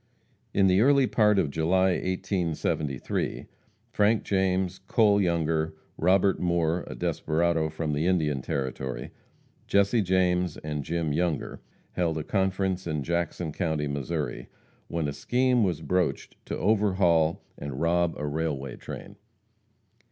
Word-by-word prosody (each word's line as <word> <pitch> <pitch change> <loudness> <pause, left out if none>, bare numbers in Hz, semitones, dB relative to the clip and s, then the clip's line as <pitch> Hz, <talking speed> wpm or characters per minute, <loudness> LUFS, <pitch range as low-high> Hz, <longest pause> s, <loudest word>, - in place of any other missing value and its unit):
In 100 - +3
the 95 +1 +4
early 140 +2 +5
part 105 -4 +3
of 75 -7 +1
July, 95 +5 +2
1873, 90 -7 -2 0.5
Frank 105 +2 +2
James, 95 -1 0
Cole 105 -3 +4
Younger, 80 -3 0 0.2
Robert 95 +2 +3
Moore, 85 -1 +1
a - - -7
desperado 80 0 0
from 80 -1 -3
the 75 +4 0
Indian 75 -7 +1
Territory, 65 -2 -4 0.6
Jesse 100 +3 +3
James 90 -2 +1
and 75 -1 -4
Jim 80 -1 -1
Younger, 85 -2 -2 0.3
held 85 -3 -1
a 80 - -3
conference 95 -1 -1
in 75 -3 -2
Jackson 85 0 -2
county, 80 -3 -1
Missouri, 70 0 -3 0.4
when 85 -3 -2
a 70 - -3
scheme 125 - +2
was 90 -6 -1
broached 90 -2 -1
to - - -3
overhaul 95 -6 +2
and 70 -2 -6
rob 85 +1 +1
a 75 - -3
railway 75 -3 -3
train. - - -9
85 Hz, 130 wpm, -27 LUFS, 80-95 Hz, 0.6 s, early